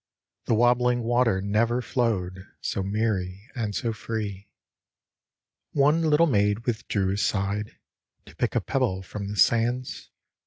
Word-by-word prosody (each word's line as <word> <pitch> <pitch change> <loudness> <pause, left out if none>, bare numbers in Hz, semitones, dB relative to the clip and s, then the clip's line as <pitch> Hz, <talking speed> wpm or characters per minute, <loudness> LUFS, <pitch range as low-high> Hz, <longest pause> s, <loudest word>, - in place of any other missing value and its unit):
The 115 - +2
wobbling 120 +1 +3
water 115 -5 +2
never 115 +4 +1
flowed 100 -8 -2
So 100 - -2
merry 100 0 -2
and 110 -6 -3
so 115 -1 -1
free. 105 -2 -5 1.2
One 150 +3 +3
little 160 +1 +4
maid 105 -5 +1
withdrew 105 -5 -1
aside 100 +1 -1 0.5
To - - -15
pick - - -1
a - - +2
pebble 95 0 -1
from 100 +2 -6
the 105 +1 -5
sands. 120 +5 +1
110 Hz, 125 wpm, -26 LUFS, 100-120 Hz, 1.2 s, little